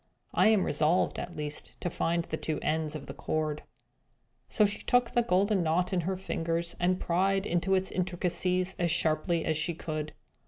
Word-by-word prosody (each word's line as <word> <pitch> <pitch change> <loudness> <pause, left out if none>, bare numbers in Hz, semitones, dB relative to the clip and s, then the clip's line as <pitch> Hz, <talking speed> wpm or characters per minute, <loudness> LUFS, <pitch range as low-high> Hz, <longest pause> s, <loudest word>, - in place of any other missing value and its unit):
I - - +5
am 215 -4 +4
resolved, 155 +4 +1
at 175 - -6
least, 150 -1 -5
to - - -1
find 170 0 0
the 160 - -4
two 155 -1 -2
ends 155 -1 0
of 145 -2 -6
the - - -7
cord." 155 -1 -2 0.9
So 215 - +4
she 205 - -2
took 245 -1 +2
the 240 - +3
golden 200 -2 +2
knot 175 +3 +1
in 180 - +2
her 185 +3 -2
fingers, 170 -2 -2
and 180 +1 +2
pried 190 +3 +1
into 180 +1 +1
its 190 0 0
intricacies 180 0 0
as 175 -1 +2
sharply 160 +1 +1
as 155 - +1
she 160 +2 -1
could. 155 -1 -4
175 Hz, 185 wpm, -29 LUFS, 160-190 Hz, 0.9 s, I